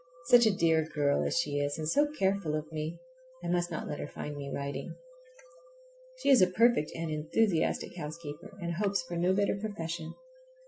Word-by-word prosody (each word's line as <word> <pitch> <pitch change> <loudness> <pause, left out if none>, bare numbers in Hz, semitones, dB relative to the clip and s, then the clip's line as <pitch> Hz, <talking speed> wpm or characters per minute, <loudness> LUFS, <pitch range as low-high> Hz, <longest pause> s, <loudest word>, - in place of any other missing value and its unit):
Such 240 -2 +8
a - - +5
dear 160 -1 +3
girl 145 -1 +2
as - - -1
she 145 -4 0
is, 145 +1 -1
and 155 -1 -3
so 290 - +3
careful 195 - 0
of 155 +1 -4
me! 155 +2 -4 0.5
I - - -3
must 175 0 +1
not 165 - -4
let 150 - -4
her - - -4
find 150 0 -6
me 140 -1 -6
writing. 140 0 -4 1.2
She - - 0
is 260 - +7
a 185 - +7
perfect, 230 -4 +3
and 165 -1 -3
enthusiastic 165 +5 0
housekeeper, 155 +1 -7
and 170 -2 -3
hopes 200 0 0
for 175 0 -6
no 175 +2 +2
better 200 +1 +2
profession. 170 -6 -5
170 Hz, 185 wpm, -30 LUFS, 155-195 Hz, 1.2 s, Such